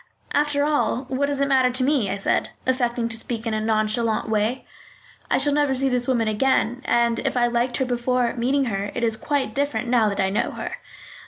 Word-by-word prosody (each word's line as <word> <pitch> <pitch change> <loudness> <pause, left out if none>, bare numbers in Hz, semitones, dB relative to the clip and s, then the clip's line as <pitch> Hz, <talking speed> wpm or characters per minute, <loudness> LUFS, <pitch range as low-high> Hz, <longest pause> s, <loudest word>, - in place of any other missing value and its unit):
"After 290 0 +1
all, 290 -3 0
what 275 +2 0
does 285 -1 -2
it 280 - +2
matter 260 -2 +3
to 255 +1 -1
me?" 265 -7 +1
I 195 - -2
said, 195 - 0 0.2
affecting 240 -2 0
to 225 - 0
speak 230 0 -3
in 225 - -1
a 215 - -1
nonchalant 220 +1 +1
way. 220 +4 0 0.6
"I - - +3
shall 285 +1 +3
never 290 -2 +2
see 270 +1 +1
this 250 -1 +1
woman 240 -4 +1
again, 245 +2 +1
and 235 -1 +2
if - - -2
I 240 - +3
liked 240 +1 0
her 265 - 0
before 245 0 0
meeting 260 +3 0
her, 200 -3 -2
it 240 - -2
is 225 -1 +2
quite 285 +4 -2
different 285 -3 -1
now 235 -3 +3
that 200 - -4
I 190 0 +1
know 205 - 0
her." - - -5
245 Hz, 220 wpm, -23 LUFS, 225-270 Hz, 0.6 s, matter